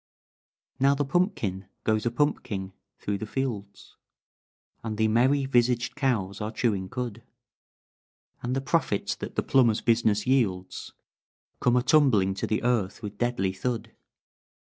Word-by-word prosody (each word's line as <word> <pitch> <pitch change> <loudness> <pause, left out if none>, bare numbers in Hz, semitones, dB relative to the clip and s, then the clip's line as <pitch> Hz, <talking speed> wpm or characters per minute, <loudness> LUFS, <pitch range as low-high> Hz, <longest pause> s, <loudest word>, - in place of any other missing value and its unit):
"Now 140 +1 +4
the 145 +1 0
pumpkin 115 - -1 0.2
goes 110 0 +1
a - - +1
pumpking 115 -8 -1 0.2
through 100 -1 -3
the 110 - -5
fields, 105 -6 -5 0.9
And 110 -2 -4
the 110 0 +3
merry 130 +5 +3
visaged 125 -1 +1
cows 110 -9 -1
are 105 - -2
chewing 100 -5 -1
cud; 120 -2 -4 1.2
And 125 +1 -2
the 135 - 0
profits 135 -7 0
that - - -7
the - - 0
plumber's 120 -5 +3
business 110 -3 +2
yields 110 -9 0 0.7
Come 125 0 +3
a 125 - +3
tumbling 125 -11 +4
to 95 - -3
the 110 - -1
earth 115 -4 0
with 105 0 -7
deadly 120 -6 0
thud. 115 +4 -3
115 Hz, 140 wpm, -27 LUFS, 100-130 Hz, 1.2 s, Now